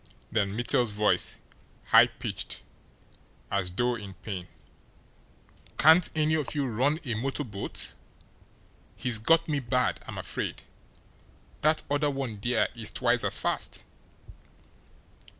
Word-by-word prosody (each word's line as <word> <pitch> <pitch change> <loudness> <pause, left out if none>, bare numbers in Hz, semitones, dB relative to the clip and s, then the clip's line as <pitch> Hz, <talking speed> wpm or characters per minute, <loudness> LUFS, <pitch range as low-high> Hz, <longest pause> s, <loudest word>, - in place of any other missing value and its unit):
Then 100 -1 0
Mittel's 120 -1 +2
voice, 105 0 +2 0.5
high - - +8
pitched, - - -5 0.9
as 100 -2 0
though 120 +7 0
in 100 -5 -7
pain: 95 -1 -6 1.3
"Can't 160 +3 +6
any 155 0 +2
of 155 -2 -1
you 145 -2 0
run 130 +6 +1
a 120 - -1
motor 135 +6 -2
boat? 105 -6 -1 1.0
He's 120 -3 +1
got 165 +8 +3
me 150 -2 0
bad, 125 0 0
I'm - - -7
afraid. - - -3 1.0
That 155 +1 +2
other 145 +1 +1
one 135 -7 -4
there 120 +3 +2
is 110 -3 0
twice 120 0 +1
as - - 0
fast." - - -2
120 Hz, 120 wpm, -28 LUFS, 105-145 Hz, 1.3 s, high